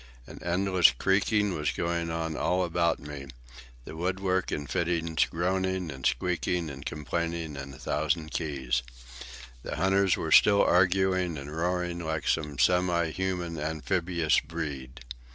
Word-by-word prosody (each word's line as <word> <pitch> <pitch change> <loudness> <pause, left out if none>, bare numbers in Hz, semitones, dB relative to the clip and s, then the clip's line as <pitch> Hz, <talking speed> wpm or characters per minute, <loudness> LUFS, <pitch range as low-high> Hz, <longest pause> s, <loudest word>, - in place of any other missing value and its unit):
An - - -11
endless 90 0 +4
creaking 100 - +2
was 75 -2 -1
going 85 0 -1
on 80 -1 -2
all 90 +4 +1
about 85 -1 +1
me, 70 -1 -8 0.6
the - - -8
woodwork 95 +2 -1
and 70 -1 -3
the - - -10
fittings 85 -2 +1
groaning 95 0 -1
and 65 -2 -1
squeaking 90 +1 -1
and 70 0 -9
complaining 80 +1 -3
in 70 -1 -7
a 65 - -11
thousand 80 +3 -1
keys. 65 -6 -1 0.8
The - - -5
hunters 95 +3 +2
were - - -3
still 100 -1 +7
arguing 90 -1 +2
and 70 +2 -7
roaring 90 +1 -1
like 80 -2 -3
some 75 -2 0
semi 90 0 +2
human 90 -2 -3
amphibious 80 +1 0
breed. 70 -6 -6
85 Hz, 140 wpm, -28 LUFS, 75-90 Hz, 0.8 s, still